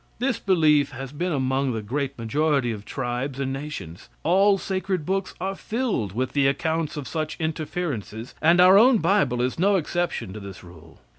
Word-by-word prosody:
This 250 0 -1
belief 155 -7 +3
has 135 +1 -7
been 175 +5 -2
among 130 -2 0
the 110 -1 -4
great 140 +5 -3
majority 135 +2 +1
of 105 -2 -7
tribes 130 +1 -3
and 135 -1 -2
nations. 135 - -7
All 195 +4 +4
sacred 190 -3 -2
books 190 +1 -2
are 190 +1 -2
filled 215 - -2
with 130 +4 -2
the 140 -1 +3
accounts 160 +3 -1
of 145 - -5
such 155 -1 -3
interferences, 155 - -4
and 170 +3 +5
our 185 +2 +8
own 250 +2 +6
bible 165 - +2
is 130 +5 -2
no 200 +3 +4
exception 175 - -2
to 110 - -7
this 100 -2 -10
rule. 85 -2 -15
145 Hz, 175 wpm, -24 LUFS, 125-180 Hz, -, our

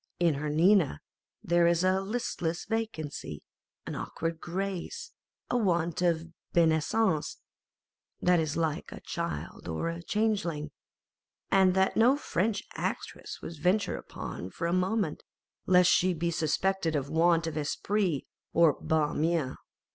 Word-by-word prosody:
In 170 -2 +4
her 145 +2 -3
Nina 165 - +4 0.4
there 170 0 +3
is 170 +1 +3
a 185 +1 +3
listless 195 -6 -2
vacancy, 160 - -4 0.4
an - - -5
awkward 165 0 -4
grace, 195 - -4 0.4
a - - +1
want 170 -5 +1
of 165 -1 0 0.2
bienseance, 160 +1 +2 0.8
that 180 -1 +4
is 155 -1 -1
like 160 -3 -1
a - - -8
child 75 +4 -5
or 85 - -2
a 170 +1 -5
changeling, 175 -7 -1 0.8
and 190 -1 +5
that 190 0 +2
no 245 +5 +5
French 210 - -1
actress - - -5
would 165 -2 -7
venture 185 +6 +2
upon 90 - -7
for 165 - -5
a 170 - +1
moment, 185 -2 0 0.5
lest 180 -1 +6
she 180 - +4
should - - -7
be 170 +1 0
suspected 165 +1 0
of 140 -2 -1
a - - -10
want 165 0 +3
of 160 -2 -4
esprit 165 +1 0 0.3
or 165 -3 +5
of - - -11
ban 155 -2 +1
mien. 160 -5 +1
170 Hz, 145 wpm, -29 LUFS, 160-190 Hz, 0.8 s, lest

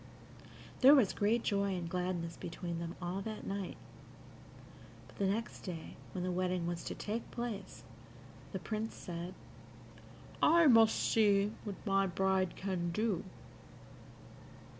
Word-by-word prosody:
There 270 +3 +9
was 240 -9 +4
great 220 +3 +2
joy 200 -2 +1
and 175 -2 -3
gladness 175 -1 -2
between 170 0 -5
them 170 +1 -5
all 180 +2 -3
that 215 +1 -6
night, 195 -1 -4 1.3
but - - -17
the 200 - +2
next 215 +3 -2
day, 170 -4 -7 0.2
when 180 - -3
the 185 - -1
wedding 180 -1 0
was 170 0 -3
to - - -4
take 220 +3 -4
place, 225 -5 -5 0.7
the - - -3
Prince 220 0 -4
said, 175 +1 -6 1.1
"I 335 +1 +6
must 225 -5 +7
see 205 -2 +3
what 205 -2 -4
my 195 -1 +3
bride 190 0 +1
can 185 -3 -2
do." 210 +1 0
195 Hz, 135 wpm, -34 LUFS, 180-215 Hz, 1.3 s, There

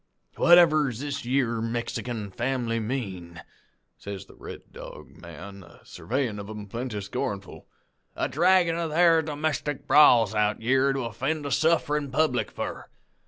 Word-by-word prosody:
"'Whatever 165 -4 +5
does 115 -2 -7
this 145 -3 -4
yere 120 -3 0
Mexican 115 -2 -4
fam'ly 120 0 -2
mean,' 95 -8 -5 0.6
says 100 -1 -7
the - - -17
Red - - -10
Dog - - -10
man, 90 +4 -11
a 90 - -16
surveyin' 120 -5 -3
of 100 0 -8
'em 105 -1 -7
plenty 115 +1 -5
scornful, 100 -1 -5 0.5
'a - - -1
draggin' 175 +1 +3
of 165 -1 -2
their 165 +1 +4
domestic 150 -2 -3
brawls 120 -8 +6
out 105 0 +1
yere 130 +4 +2
to 135 0 -2
offend 135 +7 -3
a 140 - -3
sufferin' 150 -1 +1
public 135 -2 +1
for? - - -6
125 Hz, 145 wpm, -26 LUFS, 105-150 Hz, 0.6 s, brawls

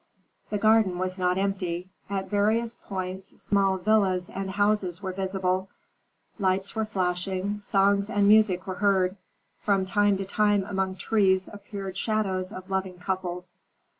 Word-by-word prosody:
The 210 - -1
garden 215 -3 +4
was 185 +1 -3
not 180 0 +1
empty. 185 -3 -2 0.2
At 195 -1 -2
various 220 +3 +1
points 190 0 -5
small 195 -1 +2
villas 190 -2 +1
and 195 0 -4
houses 205 -3 +1
were 190 -2 -4
visible, 190 0 -1 0.7
lights 190 0 0
were 220 -1 -1
flashing, 190 +1 -2
songs 200 0 +2
and 205 -3 +2
music 205 -3 +5
were 190 - -3
heard. 190 -2 +3 0.4
From 195 -2 +1
time 205 0 +2
to 195 - -3
time 205 0 +2
among 190 -1 -2
trees 190 -1 +2
appeared 200 -2 -7
shadows 195 -4 -1
of 185 -2 -8
loving 190 -1 -2
couples. 180 -1 -4
195 Hz, 140 wpm, -27 LUFS, 185-205 Hz, 0.7 s, music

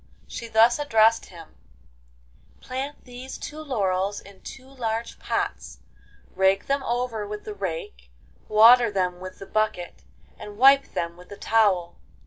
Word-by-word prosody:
She 230 - -7
thus 230 +3 +4
addressed 225 -5 +3
him: 165 -3 -14 1.0
'Plant 270 +3 -6
these 250 +1 -9
two 300 - -8
laurels 200 -8 -1
in 200 -1 -16
two 265 -1 -11
large 230 -4 -4
pots, - - -3 0.6
rake 190 +1 +2
them 275 0 0
over 240 -4 -3
with 210 0 -7
the 215 - -7
rake, 160 - -6 0.4
water 230 +2 +7
them 180 -3 -2
with 185 0 -9
the 195 - -10
bucket, 215 -4 -2 0.4
and 205 0 -10
wipe 275 +3 +5
them 170 0 -3
with 180 0 -16
the 205 - -10
towel. 200 -6 +1
215 Hz, 140 wpm, -24 LUFS, 190-245 Hz, 1.0 s, water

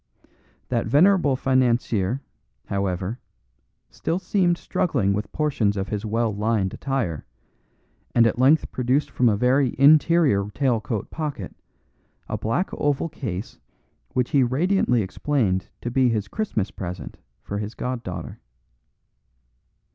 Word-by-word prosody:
That 120 -2 0
venerable 170 -2 +4
financier, 125 -3 +1 0.4
however, 100 +3 -2 0.7
still 165 - -2
seemed 185 -2 +1
struggling 120 - 0
with 105 +1 -3
portions 130 -10 0
of 95 0 -3
his 105 -1 -3
well 115 0 0
lined 105 -2 0
attire, 125 - -2 0.9
and 115 - +6
at 115 +1 +1
length 140 +4 +4
produced 130 +4 0
from 125 -2 +3
a 105 - +1
very 125 +3 +2
interior 145 - +5
tail 125 -6 +1
coat 110 -2 -4
pocket, 155 -3 -5 0.7
a - - -3
black 115 - -1
oval 145 +2 0
case 110 - -6 0.5
which 125 -1 0
he 140 - +4
radiantly 130 - +2
explained 95 -1 -1
to 120 - -3
be 130 0 +3
his 105 -3 -1
Christmas 115 - -2
present 90 -1 -7 0.3
for 100 - -4
his 105 +2 -5
god 125 -1 -3
daughter. 90 -6 -7
120 Hz, 125 wpm, -24 LUFS, 105-140 Hz, 0.9 s, and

